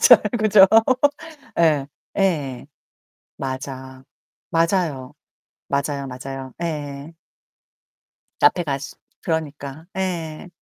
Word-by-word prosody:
잘 465 - +9 0.2
그죠? 210 -2 +7 0.9
예. 150 -5 +4 0.3
예. 145 -10 0 0.7
맞아. 130 0 -6 0.5
맞아요. 165 -6 0 0.6
맞아요, 140 0 -1
맞아요. 130 0 -7
예예. 145 -1 -4 1.3
카페 175 +5 +4
가서 140 -3 -4 0.3
그러니까 155 -1 -3
예. 175 -3 -3
145 Hz, 155 characters per minute, -22 LUFS, 135-165 Hz, 1.3 s, 잘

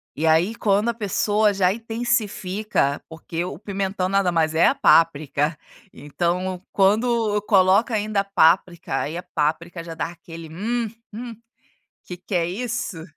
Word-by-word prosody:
E 155 - -2
aí 165 +7 +3
quando 210 +1 +1
a - - 0
pessoa 210 -1 +1
já 190 -1 +2
intensifica, 215 - -1
porque 165 +1 -5
o 175 -5 -6
pimentão 195 -2 -2
nada 195 -1 +1
mais 160 -2 +1
é 165 - +5
a - - +2
páprica, 155 -1 +3 0.3
então 175 +5 -3
quando 215 +1 +2
coloca 195 +4 +4
ainda 210 -1 0
a - - -5
páprica, 175 -5 +2
aí 155 +4 -4
a 175 - -6
páprica 165 +3 -1
já 165 0 -7
dá 160 - -2
aquele, 165 -1 -11
hum 225 +7 -2 0.2
hum, 235 +1 -7 0.7
que 180 - -8
que 185 +2 -6
é 170 -1 +1
isso! 215 -3 -4
185 Hz, 150 wpm, -22 LUFS, 165-210 Hz, 0.7 s, é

